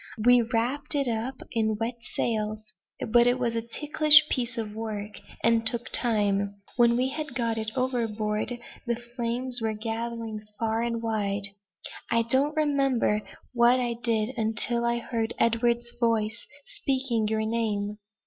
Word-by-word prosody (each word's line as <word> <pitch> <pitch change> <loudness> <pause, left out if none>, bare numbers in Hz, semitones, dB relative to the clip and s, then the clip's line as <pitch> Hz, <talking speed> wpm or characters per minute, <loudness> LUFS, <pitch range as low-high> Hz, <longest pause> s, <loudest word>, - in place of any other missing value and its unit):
We 245 0 +7
wrapped 245 +6 +1
it 280 -2 +1
up 235 +3 -2 0.2
in 220 -2 0
wet 235 +1 -3 0.2
sails, 215 -3 -2 0.4
but 240 +1 +6
it 245 +1 +3
was 235 -2 -1
a 230 - 0
ticklish 300 +5 +5
piece 240 -2 -1
of 215 -2 -3
work, 215 -2 -5 0.2
and 230 0 +4
took 235 +1 -3
time. 205 -4 +1 0.2
When 235 -1 +5
we 255 +1 +1
had 300 -2 -5
got 230 -2 0
it 220 0 -3
overboard, 230 -3 -1 0.3
the 235 - +1
flames 240 +1 -3
were 220 -1 0
gathering 225 0 -4
far 225 0 0
and 235 -1 -2
wide. 205 -3 -1 0.6
I 230 0 +3
don't 270 +6 +1
remember 275 -8 +2 0.3
what 240 +1 +5
I 240 -1 0
did 230 0 -1
until 225 +2 +1
I 235 0 +1
heard 230 -1 -3
Edward's 235 +1 +1
voice 230 -1 0 0.2
speaking 260 -5 0
your 220 0 0
name." 210 -2 -1
230 Hz, 150 wpm, -27 LUFS, 220-245 Hz, 0.6 s, We